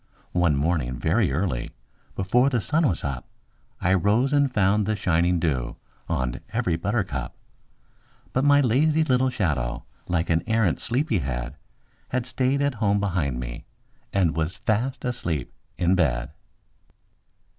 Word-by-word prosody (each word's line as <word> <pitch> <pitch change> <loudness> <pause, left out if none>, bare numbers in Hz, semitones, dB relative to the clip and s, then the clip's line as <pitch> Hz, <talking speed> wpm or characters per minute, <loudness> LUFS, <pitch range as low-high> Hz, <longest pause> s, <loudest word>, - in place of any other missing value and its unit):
MY - - -39
SHADOW - - -36
[Pg - - -5
21] - - +3
One 75 -3 +2
morning, 65 -8 -1
very - - +2
early, 70 -5 -1 0.4
before 125 +8 +3
the 125 -3 +1
sun 155 +8 +1
was 85 - -3
up, 70 -3 -4 0.5
I 90 - +2
rose 105 - +2
and 140 -2 +3
found 105 -1 +2
the 110 - +1
shining 90 -2 +2
dew 65 -8 -1 0.3
on 65 -7 -1
every 85 - 0
buttercup; 90 - -2 1.0
But 130 - +1
my 145 0 +6
lazy 150 +6 +3
little 130 -3 +2
shadow, 70 - -1 0.2
like 85 -1 0
an 80 0 +3
arrant 110 -7 +1
sleepy 125 - 0
head, 65 -2 -4 0.5
Had 125 -1 -1
stayed 130 +2 0
at 140 -1 +1
home 100 -1 +3
behind 85 -11 -1
me - - -6 0.5
and 90 -5 +2
was 80 +3 -1
fast 120 +6 -1
asleep 85 - -3 0.2
in 90 +1 +2
bed. 65 -10 +1
95 Hz, 155 wpm, -25 LUFS, 75-125 Hz, 1.0 s, my